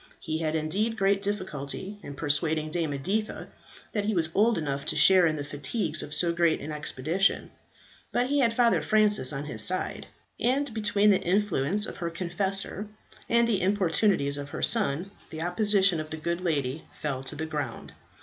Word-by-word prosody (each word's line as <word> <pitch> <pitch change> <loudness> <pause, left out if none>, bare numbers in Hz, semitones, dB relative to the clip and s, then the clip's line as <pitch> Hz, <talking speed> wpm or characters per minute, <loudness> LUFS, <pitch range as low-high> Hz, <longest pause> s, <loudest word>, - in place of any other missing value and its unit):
He 160 -2 -4
had 160 -1 -1
indeed 200 +9 -1
great 195 0 +2
difficulty 190 -1 -5
in 140 - -9
persuading 155 +1 0
Dame 165 -2 -1
Editha 200 +11 -3 0.4
that 210 -2 -2
he 215 -1 0
was 165 -2 +1
old 225 +3 +3
enough 140 -3 -3
to - - -1
share 185 -2 +6
in 155 - -1
the 145 - -4
fatigues 150 +4 -2
of - - -8
so 170 +2 +2
great 170 -2 +2
an 155 - -7
expedition, 155 +5 0 0.6
but 245 - +1
he 285 +3 0
had 235 -4 +3
Father 235 0 +2
Francis 210 -11 +4
on 140 0 -5
his 115 -7 -1
side; 185 0 +2 0.3
and 265 +1 0
between 210 -1 +2
the 195 - +2
influence 195 0 +1
of - - -8
her 170 -2 -3
confessor, 190 +4 -2 0.4
and 235 0 +3
the 205 -5 0
importunities 185 -5 +1
of 140 0 -7
her - - -5
son, 195 -4 +2 0.2
the 160 0 -5
opposition 190 -1 +2
of 155 0 -6
the 160 - -5
good 170 +3 -3
lady 150 -4 -2 0.2
fell 135 -4 -3
to 135 +3 -4
the 160 +2 -4
ground. 145 -6 -5
175 Hz, 180 wpm, -27 LUFS, 155-205 Hz, 0.6 s, share